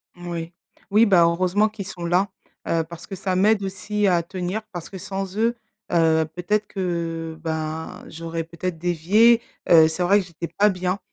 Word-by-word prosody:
Moui. 170 Hz, -1 st, -6 dB, 0.4 s
Oui, 215 Hz, +3 st, +6 dB
bah 185 Hz, -5 st, +5 dB
heureusement 185 Hz, +5 st, +2 dB
qu'ils 205 Hz, -2 st, -7 dB
sont 175 Hz, -3 st, -6 dB
là, 180 Hz, +3 st, +2 dB, 0.4 s
heu, 165 Hz, -1 st, +1 dB
parce 165 Hz, +1 st, -11 dB
que 195 Hz, -, -6 dB
ça 185 Hz, 0 st, -2 dB
m'aide 200 Hz, +2 st, +3 dB
aussi 200 Hz, +2 st, -1 dB
à 175 Hz, -2 st, +3 dB
tenir. 185 Hz, +4 st, -4 dB
Parce 175 Hz, -3 st, -7 dB
que 195 Hz, -, -8 dB
sans 195 Hz, +1 st, -5 dB
eux, 230 Hz, +2 st, +2 dB, 0.4 s
heu, 160 Hz, -1 st, +3 dB
peut-être 210 Hz, +4 st, 0 dB
que 165 Hz, -4 st, -3 dB
ben 160 Hz, 0 st, -4 dB
j'aurais 165 Hz, 0 st, -5 dB
peut-être 170 Hz, +1 st, -5 dB
dévié, 185 Hz, +8 st, +4 dB, 0.3 s
heu, 160 Hz, -2 st, +8 dB
c'est 170 Hz, +3 st, -2 dB
vrai 200 Hz, +3 st, +5 dB
que 195 Hz, -, -4 dB
j'étais 170 Hz, -1 st, -6 dB
pas 210 Hz, +1 st, +5 dB
bien. 185 Hz, +1 st, -1 dB
180 Hz, 180 wpm, -23 LUFS, 165-200 Hz, 0.4 s, heu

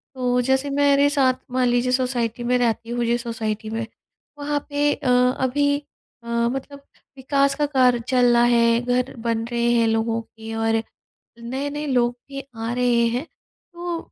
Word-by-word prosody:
तो 250 Hz, -1 st, +1 dB
जैसे 265 Hz, +3 st, +1 dB
मेरे 285 Hz, 0 st, +3 dB
साथ 275 Hz, -3 st, +3 dB, 0.2 s
मान 255 Hz, 0 st, +1 dB
लीजिए 245 Hz, +1 st, +1 dB
सोसाइटी 250 Hz, -2 st, -1 dB
में 250 Hz, +1 st, +2 dB
रहती 230 Hz, -1 st, 0 dB
हूँ 240 Hz, 0 st, -1 dB
जिस 235 Hz, +1 st, 0 dB
सोसाइटी 220 Hz, -2 st, -4 dB
में, 225 Hz, +1 st, -3 dB, 0.5 s
वहाँ 290 Hz, 0 st, -1 dB
पे 290 Hz, 0 st, +1 dB
अ, -, -, -3 dB, 0.3 s
अभी 285 Hz, +2 st, +1 dB, 0.5 s
अ, -, -, -13 dB
मतलब 245 Hz, +4 st, -2 dB, 0.4 s
विकास 275 Hz, +1 st, +1 dB
का 295 Hz, +1 st, +1 dB
कार्य 255 Hz, -4 st, +3 dB
चल 245 Hz, -2 st, +4 dB
रहा 235 Hz, 0 st, +4 dB
है, 235 Hz, -1 st, +4 dB
घर 250 Hz, +1 st, -1 dB
बन 230 Hz, -1 st, -1 dB
रहे 235 Hz, 0 st, +1 dB
हैं 230 Hz, -1 st, +3 dB
लोगों 225 Hz, +1 st, 0 dB
के 225 Hz, 0 st, -10 dB
और 225 Hz, 0 st, +1 dB, 0.6 s
नए-नए 280 Hz, +5 st, -4 dB
लोग 245 Hz, -2 st, +1 dB
भी 275 Hz, 0 st, -6 dB
आ 225 Hz, +1 st, -4 dB
रहे 245 Hz, -1 st, +2 dB
हैं। 250 Hz, -, -2 dB, 0.5 s
तो 345 Hz, 0 st, -4 dB
245 Hz, 165 wpm, -22 LUFS, 235-275 Hz, 0.6 s, चल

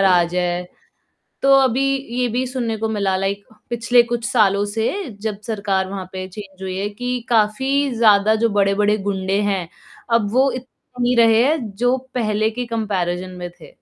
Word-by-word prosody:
राज 180 Hz, -2 st, +3 dB
है। 180 Hz, 0 st, -1 dB, 0.8 s
तो 275 Hz, 0 st, +5 dB
अभी 260 Hz, 0 st, +2 dB, 0.4 s
ये 250 Hz, -, +2 dB
भी 250 Hz, +3 st, -1 dB
सुनने 240 Hz, -4 st, -2 dB
को 220 Hz, +1 st, -2 dB
मिला 200 Hz, -3 st, 0 dB
लाइक 195 Hz, +1 st, -2 dB, 0.3 s
पिछले 240 Hz, +1 st, +3 dB
कुछ 235 Hz, 0 st, -3 dB
सालों 200 Hz, -4 st, +3 dB
से 220 Hz, +2 st, -1 dB, 0.3 s
जब 210 Hz, -2 st, -3 dB
सरकार 200 Hz, -3 st, -1 dB
वहाँ 190 Hz, -2 st, -5 dB
पे 185 Hz, 0 st, -5 dB
चेंज 195 Hz, -1 st, -11 dB
हुई 185 Hz, 0 st, -4 dB
है 200 Hz, +1 st, -2 dB
कि 245 Hz, +4 st, -3 dB
काफ़ी 265 Hz, +6 st, +2 dB
ज़्यादा 215 Hz, -1 st, +5 dB
जो 230 Hz, -, +3 dB
बड़े-बड़े 205 Hz, +1 st, +2 dB
गुंडे 195 Hz, -1 st, -1 dB
हैं 195 Hz, -4 st, -1 dB, 0.5 s
अब 210 Hz, -3 st, +1 dB
वो 265 Hz, +2 st, +3 dB
इत 255 Hz, +1 st, -6 dB, 0.3 s
नहीं 245 Hz, 0 st, +2 dB
रहे 235 Hz, +6 st, +5 dB
जो 245 Hz, +1 st, -1 dB, 0.2 s
पहले 215 Hz, -2 st, +1 dB
के 245 Hz, +2 st, -4 dB
कम्पैरिज़न 185 Hz, -6 st, -2 dB
में 175 Hz, 0 st, -5 dB
थे। -, -, -13 dB
210 Hz, 170 wpm, -20 LUFS, 195-240 Hz, 0.8 s, तो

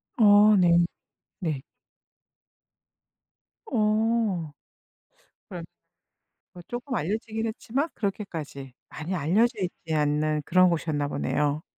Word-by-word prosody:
어 210 Hz, -1 st, +7 dB
네. 175 Hz, -2 st, +5 dB, 0.6 s
네. 155 Hz, -7 st, -2 dB, 2.0 s
어. 215 Hz, -, +1 dB, 1.0 s
그럼 -, -, -6 dB, 0.9 s
그 175 Hz, -, -11 dB
쪼끔 245 Hz, +2 st, -5 dB
알려지긴 220 Hz, +5 st, -2 dB
했지만 250 Hz, +7 st, -2 dB
그렇게까지 165 Hz, -, -5 dB, 0.2 s
많이 160 Hz, +5 st, -5 dB
알려져 185 Hz, +9 st, +2 dB
있지 170 Hz, -3 st, -4 dB
않는 150 Hz, 0 st, +1 dB
그런 185 Hz, 0 st, +5 dB
곳이었나 155 Hz, -3 st, -1 dB
보네요. 150 Hz, +1 st, -1 dB
185 Hz, 200 characters per minute, -26 LUFS, 155-220 Hz, 2.0 s, 어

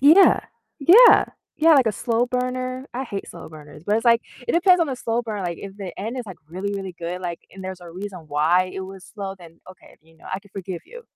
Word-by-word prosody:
Yeah. 315 Hz, +8 st, +7 dB, 0.4 s
Yeah. 400 Hz, -, +8 dB, 0.3 s
Yeah, 325 Hz, +1 st, +6 dB
like 265 Hz, -4 st, +5 dB
a 220 Hz, -, +2 dB
slow 235 Hz, +3 st, 0 dB
burner. 255 Hz, +1 st, -3 dB
I 260 Hz, +2 st, -3 dB
hate 200 Hz, -5 st, -6 dB
slow -, -, -10 dB
burners, 150 Hz, 0 st, -13 dB
but 205 Hz, -, +1 dB
it's 225 Hz, -, -2 dB
like, 235 Hz, -1 st, +5 dB, 0.3 s
it -, -, +2 dB
depends 360 Hz, +1 st, +5 dB
on 335 Hz, -, +3 dB
the 265 Hz, -, -3 dB
slow 235 Hz, 0 st, -1 dB
burn, 215 Hz, -4 st, -4 dB
like, 170 Hz, -2 st, -3 dB
if 195 Hz, 0 st, -9 dB
the 195 Hz, -4 st, -7 dB
end 225 Hz, +5 st, -4 dB
is, 245 Hz, -, -5 dB
like, 190 Hz, -4 st, -9 dB
really, 190 Hz, +4 st, -4 dB
really 195 Hz, -2 st, -5 dB
good, 175 Hz, +2 st, -4 dB
like, 175 Hz, -2 st, -4 dB
and 190 Hz, 0 st, -10 dB
there's 185 Hz, -1 st, -6 dB
a 175 Hz, -, -11 dB
reason 185 Hz, +2 st, -7 dB
why 165 Hz, +5 st, +2 dB
it -, -, -4 dB
was 190 Hz, 0 st, -9 dB
slow, 195 Hz, -2 st, -5 dB
then 165 Hz, -2 st, -15 dB
okay, 185 Hz, -, -18 dB
you 160 Hz, +1 st, -24 dB
know, -, -, -21 dB
I 190 Hz, -, -2 dB
can 200 Hz, -, -22 dB
forgive 190 Hz, -3 st, -6 dB
you. 485 Hz, +6 st, -12 dB
200 Hz, 250 wpm, -23 LUFS, 180-250 Hz, 0.4 s, Yeah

